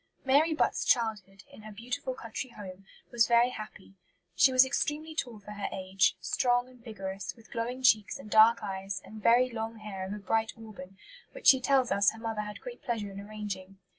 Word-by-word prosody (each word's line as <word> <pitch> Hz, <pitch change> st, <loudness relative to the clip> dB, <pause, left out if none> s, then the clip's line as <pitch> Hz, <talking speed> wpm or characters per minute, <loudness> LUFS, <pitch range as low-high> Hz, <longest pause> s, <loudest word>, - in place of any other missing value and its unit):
Mary 290 Hz, +5 st, +4 dB
Butt's -, -, +1 dB
childhood, 210 Hz, -5 st, 0 dB
in -, -, -13 dB
her 215 Hz, 0 st, -10 dB
beautiful 245 Hz, +4 st, -5 dB
country 230 Hz, +3 st, -6 dB
home, 195 Hz, -4 st, -11 dB, 0.2 s
was 235 Hz, -2 st, +3 dB
very 235 Hz, +1 st, +4 dB
happy. 215 Hz, -4 st, -10 dB, 0.4 s
She 265 Hz, -, +5 dB
was 255 Hz, 0 st, +6 dB
extremely 300 Hz, +3 st, -2 dB
tall 245 Hz, -8 st, -4 dB
for 210 Hz, 0 st, -12 dB
her 205 Hz, -1 st, -4 dB
age, 190 Hz, 0 st, +1 dB
strong 245 Hz, 0 st, +1 dB
and 250 Hz, -2 st, -19 dB
vigorous, 195 Hz, -4 st, -6 dB
with 230 Hz, -2 st, -20 dB
glowing 245 Hz, +2 st, -4 dB
cheeks 220 Hz, 0 st, +4 dB
and 275 Hz, -, -11 dB
dark 220 Hz, +2 st, +5 dB
eyes 195 Hz, -1 st, -4 dB
and 215 Hz, 0 st, -11 dB
"very 245 Hz, +3 st, +4 dB
long 225 Hz, 0 st, -4 dB
hair 210 Hz, -3 st, -7 dB
of -, -, -7 dB
a -, -, -5 dB
bright 220 Hz, +2 st, -1 dB
auburn," 195 Hz, -4 st, -11 dB, 0.4 s
which -, -, -11 dB
she 265 Hz, -1 st, +7 dB
tells 260 Hz, -1 st, +2 dB
us 200 Hz, +2 st, +3 dB
her 225 Hz, -, -12 dB
mother 225 Hz, -2 st, -3 dB
had 210 Hz, 0 st, -8 dB
great -, -, -9 dB
pleasure 220 Hz, -4 st, -3 dB
in 195 Hz, -, -8 dB
arranging. 200 Hz, -2 st, -7 dB
220 Hz, 195 wpm, -29 LUFS, 200-245 Hz, 0.4 s, she